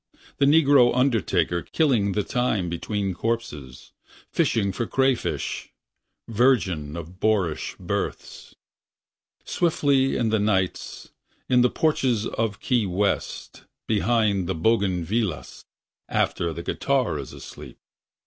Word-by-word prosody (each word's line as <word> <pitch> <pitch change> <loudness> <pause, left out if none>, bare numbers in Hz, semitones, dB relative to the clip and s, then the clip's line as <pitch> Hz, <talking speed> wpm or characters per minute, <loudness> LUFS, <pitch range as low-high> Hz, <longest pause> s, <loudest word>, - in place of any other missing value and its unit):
The 140 - +4
negro 140 -5 +5
undertaker 95 - +1
Killing 120 - +1
the 105 - 0
time 110 -8 -1
between 100 +3 -2
corpses 90 - -4 0.4
Fishing 100 -4 +1
for 115 +4 -3
crawfish... 135 -2 -1 0.6
Virgin 100 - +1
of 85 +3 -9
boorish 100 -8 0
births. - - -5 0.9
Swiftly 140 -5 +1
in 115 -2 +1
the 110 0 +1
nights. 95 -3 -1 0.4
In 125 -1 +4
the 125 - +4
porches 130 -9 +1
of 110 -2 -2
Key 120 -6 +1
West, 100 +2 -2 0.2
Behind 105 -4 +1
the - - -1
bougainvilleas. 100 0 -1 0.4
After 85 -1 0
the 85 +1 -6
guitar 130 - 0
is 70 - -7
asleep. - - -11
110 Hz, 110 wpm, -24 LUFS, 90-125 Hz, 0.9 s, negro